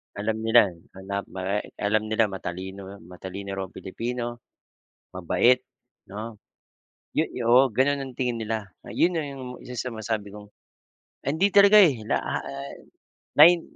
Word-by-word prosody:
Alam 110 +2 -2
nila 110 -3 +6 0.2
na 100 +1 -5
ma 95 +2 -2
eh, - - -8
alam 105 +1 0
nila 110 -1 +1
matalino 95 +1 -6
o 100 -1 -11
matalino 95 +3 -8
raw 95 - -2
ang 95 - -22
Pilipino, 120 +4 -4 0.8
mabait 120 +8 +3 0.5
'no. 110 +1 -7 0.7
Yo - - +1
yo 125 - -5
oo 125 +3 +6
gano'n 135 +5 +1
ang 130 -2 -7
tingin 125 -3 -1
nila, 110 -3 -4 0.2
ayon 175 - +2
na 165 - 0
'yong 135 -4 -7
isa 125 - -9
sa 125 +1 -3
masabi 110 -2 -4
kong 105 0 -11 0.7
hindi 160 +9 +1
talaga 200 +1 +8
eh, 145 - +5
la, 110 - 0
ha, - - -2
eh, 70 0 -9 0.5
nine 170 +3 +8
110 Hz, 155 wpm, -25 LUFS, 100-130 Hz, 0.8 s, talaga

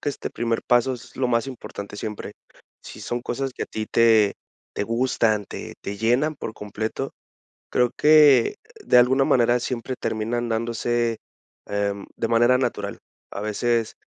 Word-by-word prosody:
que - - -2
este 140 - -4
primer 115 -1 -2
paso 125 +2 +3
es 120 0 -13
lo 130 -1 0
más 115 +2 +1
importante 105 -5 -8
siempre, 105 0 -6 0.5
si - - -10
son 120 0 -3
cosas 135 +2 -3
que - - -3
a - - -20
ti 110 0 -4
te 110 -3 +4 0.4
te - - -2
gustan 115 -3 +1
te - - -8
te 100 0 -5
llenan 125 +7 +1
por 110 - -6
completo. 110 +6 -4 0.6
Creo 125 -1 +2
que 150 -5 +6 0.3
de - - +4
alguna 130 +2 +5
manera 120 -1 +3
siempre 125 +1 -3
terminan 115 +2 -2
dándose 115 0 -1 0.5
em, 100 -1 -2
de 115 - -1
manera 120 +2 +4
natural. 130 - -2 0.3
A - - -6
veces, 115 +2 0
120 Hz, 160 wpm, -23 LUFS, 110-125 Hz, 0.6 s, que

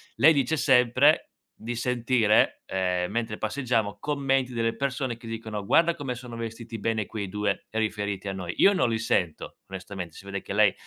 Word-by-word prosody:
lei 160 +3 +7
dice 140 +2 +1
sempre 130 +2 +4 0.3
di 115 +2 -5
sentire, 120 -2 +2
ehm, 90 -1 -1
mentre 115 -1 -2
passeggiamo 115 -3 -1
commenti 135 -3 0
delle 115 -1 0
persone 130 -2 -2
che 115 +1 -15
dicono: 110 -2 -5
"Guarda 165 +9 +4
come 135 -3 -4
sono 120 -1 -9
vestiti 115 0 -6
bene 110 0 -1
quei 100 -4 -5
2." 105 0 -2
Riferiti 105 -2 -2
a 95 - -2
noi. 90 -2 -5
Io 200 - +6
non 180 -11 +2
li 115 -1 -1
sento 90 -7 -1
onestamente, 95 -3 -7
si - - -12
vede 100 -1 -4
che - - -6
lei 105 -1 +5
115 Hz, 175 wpm, -26 LUFS, 100-125 Hz, 0.3 s, lei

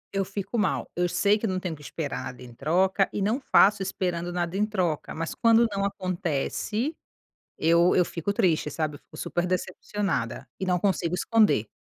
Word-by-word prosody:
Eu 195 - +2
fico 200 +4 -4
mal, 205 - 0
eu 175 0 +1
sei 200 +4 +3
que 225 - -1
eu - - -2
não 185 0 -1
tenho 180 -3 -4
que 150 - -16
esperar 145 -2 -4
nada 125 -1 -8
em 120 -1 -11
troca 185 - +2
e - - -3
não 215 +7 +1
faço 210 -5 +5
esperando 180 -2 -2
nada 175 0 -2
em 205 - +2
troca. 185 -8 -1
Mas 165 +1 -3
quando 230 0 +4
não 195 0 -1
acontece 185 - -2 0.6
eu 170 +2 +4
eu 180 - +4
fico 170 +4 -3
triste, 170 -6 +2
sabe, 150 0 -2
eu - - -15
fico - - -17
super 175 0 -2
decepcionada 185 - -2
e 190 - -3
não 180 -1 +2
consigo 180 -3 0
esconder. 210 - +3
185 Hz, 195 wpm, -26 LUFS, 165-200 Hz, 0.6 s, faço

